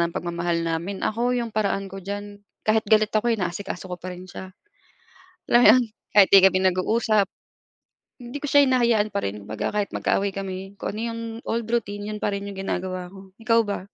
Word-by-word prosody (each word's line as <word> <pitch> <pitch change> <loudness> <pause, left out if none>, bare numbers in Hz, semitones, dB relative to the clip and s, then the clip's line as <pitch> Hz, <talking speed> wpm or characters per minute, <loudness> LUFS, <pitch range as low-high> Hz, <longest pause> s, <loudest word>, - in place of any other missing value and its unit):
ng 170 0 0
pagmamahal 170 0 -1
namin. 165 +4 -3
Ako 240 +3 0
'yong 235 -1 -3
paraan 200 -2 0
ko 195 0 -9
diyan, 205 +1 -6 0.3
kahit 220 0 +3
galit 215 0 +4
ako 220 +2 +2
inaasikaso 190 -2 -3
ko 180 - -5
pa 185 +2 -6
rin 180 +1 -10
siya, 190 +1 -9 1.0
alam 240 - +6
mo - - +8
'yon 255 - +4 0.3
kahit 200 -2 +7
di 195 - +8
kami 190 -1 +5
nag-uusap, 200 +3 +2 0.9
hindi 245 +2 -7
ko 295 - -3
siya 285 0 +6
hinahayaan 235 -5 +2
pa 200 - 0
rin, 100 +1 -4
kumbaga 105 +1 -3
kahit 205 -1 -1
magkaaway 200 0 0
kami, 195 0 -6
kung 200 - -3
ano - - -3
yung 230 - -6 0.3
old 230 0 -1
routine 205 -3 -2
'yun 210 - -7
pa - - +1
rin 200 0 -4
'yung 200 - -7
ginagawa 185 -1 -3
ko. 195 - -12 0.2
Ikaw 230 0 +3
ba? 205 -1 -3
200 Hz, 200 wpm, -24 LUFS, 185-220 Hz, 1.0 s, mo